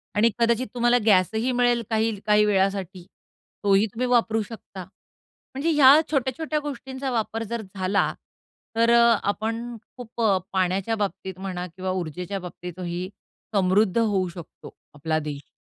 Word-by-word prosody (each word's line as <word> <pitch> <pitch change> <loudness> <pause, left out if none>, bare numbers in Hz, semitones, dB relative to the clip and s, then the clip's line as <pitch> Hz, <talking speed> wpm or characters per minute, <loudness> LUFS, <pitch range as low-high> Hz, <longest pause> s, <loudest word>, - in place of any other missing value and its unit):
आणि 215 +3 +4
कदाचित 235 +2 +2
तुम्हाला 240 0 +3
गॅस 185 -5 +5
ही 240 +4 0
मिळेल 245 -1 +2
काही 220 -2 0
काही 210 0 +4
वेळासाठी 190 -2 0 0.6
तोही 200 +1 +4
तुम्ही 250 +2 -1
वापरू 230 -2 +2
शकता. 200 -3 -9 0.7
म्हणजे 280 +5 -1
ह्या 290 0 +7
छोट्या-छोट्या 295 +3 -1
गोष्टींचा 270 -2 -5
वापर 225 -1 -2
जर 235 -1 -3
झाला 190 +1 +1 0.6
तर 230 +1 +3
अ, 235 -1 +5
आपण 225 +4 -2 0.2
खूप 235 -1 -7
अ, 200 -4 +4 0.2
पाण्याच्या 190 +4 0
बाबतीत 190 -1 -5
म्हणा 185 -2 -4
किंवा 185 0 -3
ऊर्जेच्या 180 +4 -5
बाबतीत 180 0 -9
ही 180 +1 -4 0.5
समृद्ध 195 +2 +3
होऊ 205 -5 +2
शकतो, 170 -2 -12 0.2
आपला 155 +2 -1
देश. 145 -2 -7
210 Hz, 140 wpm, -24 LUFS, 185-235 Hz, 0.7 s, ह्या